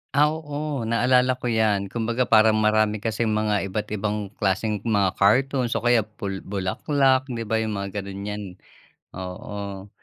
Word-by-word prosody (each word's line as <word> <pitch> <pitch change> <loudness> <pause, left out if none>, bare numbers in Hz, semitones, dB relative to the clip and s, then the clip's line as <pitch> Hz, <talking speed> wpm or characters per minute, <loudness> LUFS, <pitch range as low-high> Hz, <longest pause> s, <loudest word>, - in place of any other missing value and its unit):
Ah, 150 +1 +5
oo 145 -5 -4
naalala 125 +2 +3
ko 125 -1 -3
yan. 105 -3 +1
Kumbaga 120 +2 0
parang 110 -2 +5
marami 110 0 +2
kasing 115 0 -1
mga 105 -2 0
iba't 105 +2 -3
ibang 105 -1 -2
klaseng 105 +1 0
mga 100 -4 +1
cartoons 125 +4 +2
o - - -1
kaya 120 -1 +4
bu 105 -2 -6 0.2
bulaklak, 130 +7 +1
'di 120 -3 -4
ba 110 +1 0
yung 110 -2 -2
mga 100 +1 -4
ganun, 100 0 -7
yan 105 0 -4 0.7
oo. 100 +1 -7
110 Hz, 155 wpm, -24 LUFS, 100-120 Hz, 0.7 s, Ah